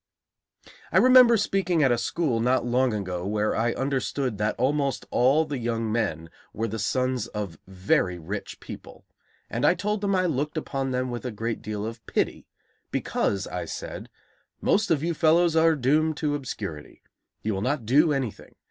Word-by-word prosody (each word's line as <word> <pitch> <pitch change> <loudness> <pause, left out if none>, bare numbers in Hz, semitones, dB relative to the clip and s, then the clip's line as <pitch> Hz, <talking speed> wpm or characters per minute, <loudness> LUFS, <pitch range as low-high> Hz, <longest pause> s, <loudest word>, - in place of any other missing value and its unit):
I - - +3
remember 255 -2 +7
speaking 185 -5 +1
at 130 - +4
a 120 - +3
school 125 0 0
not 125 +2 +2
long 125 +1 +2
ago 90 -4 -3
where 105 +2 0
I 120 +1 +1
understood 135 -3 -2
that 105 +1 0
almost 140 +1 0
all 140 +6 +3
the 145 -4 -4
young 115 -2 -2
men 80 -8 -2 0.2
were 115 +1 -2
the 110 +1 -4
sons 125 +1 0
of 100 -8 -6
very 95 -1 0
rich 95 +5 -6
people, - - -11 0.4
and - - -3
I - - +5
told 205 +3 -2
them 200 -1 +1
I 185 0 +2
looked 150 -1 -1
upon 135 -3 -2
them 130 0 -1
with 120 - -5
a 125 - -3
great 115 +1 -4
deal 105 -1 -4
of 115 0 -7
pity, - - -1 0.4
because, 100 -1 -1
I - - -4
said: - - -7 0.5
"Most 210 0 +2
of 155 -3 +2
you 170 +1 0
fellows 165 +1 +3
are 160 0 +5
doomed 150 +3 +1
to 150 -2 0
obscurity. 100 - -6 0.4
You 110 - 0
will 95 - -2
not 130 0 -1
do 150 +7 +4
anything. 135 -6 -4
130 Hz, 175 wpm, -26 LUFS, 110-155 Hz, 0.5 s, remember